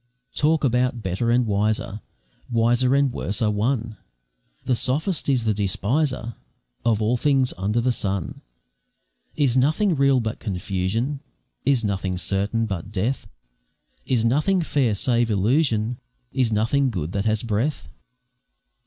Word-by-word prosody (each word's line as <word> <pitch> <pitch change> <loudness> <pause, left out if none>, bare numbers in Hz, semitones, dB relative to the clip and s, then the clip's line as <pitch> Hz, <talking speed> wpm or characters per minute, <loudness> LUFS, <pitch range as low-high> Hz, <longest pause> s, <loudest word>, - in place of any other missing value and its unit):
Talk 155 +1 +2
about 125 -2 +1
better 95 +6 -1
and 120 +1 +3
wiser, 105 0 0 0.5
Wiser 120 +2 +3
and 140 -3 +2
worse 100 - -3
are 110 -2 +2
one, 110 +1 -1 0.7
The 130 - +2
sophist 150 - -1
is 125 -4 +1
the 110 - +2
despiser 115 +6 -1 0.5
Of 110 -2 +2
all 120 +4 +2
things 135 -1 +2
under 100 +6 0
the 125 +2 +2
sun; 100 -6 -3 0.9
Is 140 -5 +2
nothing 155 +9 +3
real 140 -2 +3
but 110 -2 -3
confusion? 100 +7 -2 0.5
Is 130 -3 +2
nothing 95 -3 -1
certain 100 +5 0
but 100 -1 -5
death? 110 +6 -2 0.8
Is 120 -3 +1
nothing 155 +10 +2
fair 130 -9 +1
save 120 +2 +1
illusion? 115 +2 +1 0.3
Is 130 -4 +1
nothing 120 +6 +2
good 85 -8 -3
that 100 +2 -2
has 110 0 +1
breath? 115 - -1
115 Hz, 135 wpm, -23 LUFS, 105-130 Hz, 0.9 s, and